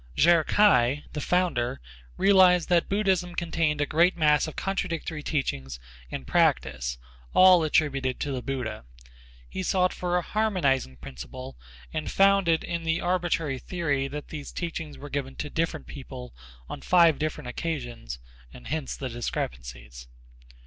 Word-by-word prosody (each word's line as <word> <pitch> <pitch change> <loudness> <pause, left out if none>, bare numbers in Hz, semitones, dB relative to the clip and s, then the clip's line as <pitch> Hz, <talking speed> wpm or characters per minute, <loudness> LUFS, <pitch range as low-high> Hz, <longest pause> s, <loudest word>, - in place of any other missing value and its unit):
Chih 170 +1 +5
K'ai, 145 - +4
the 150 - -3
founder, 150 - 0 0.4
realized 185 -3 +5
that 175 -2 +3
Buddhism 190 -3 +1
contained 165 -3 0
a - - +2
great 170 +5 +3
mass 150 -1 +3
of 155 - -8
contradictory 170 -5 -3
teachings 65 - -3 0.3
and 65 - -6
practice, 65 -2 +1 0.4
all 185 -2 +7
attributed 140 -4 +1
to 145 - -2
the 130 -2 -3
Buddha. 125 - -4 0.6
He - - -5
sought 185 0 +1
for 180 0 -1
a 175 - -1
harmonizing 170 - 0
principle 65 +1 -9 0.4
and 155 -1 -3
found 195 -1 +4
it 165 -1 +2
in 170 -1 -3
the 165 0 0
arbitrary 175 -6 0
theory 145 -4 -1
that 150 +1 -7
these 150 -2 -7
teachings 160 -3 -5
were 145 - -9
given 135 -2 -3
to 150 - -5
different 165 -1 -2
people 130 -3 -9 0.3
on - - -7
five 170 -4 +4
different 150 -3 -3
occasions 120 - -5 0.3
and 60 - -13
hence 155 -1 -3
the 135 - -4
discrepancies. - - -5
150 Hz, 145 wpm, -26 LUFS, 130-175 Hz, 0.6 s, all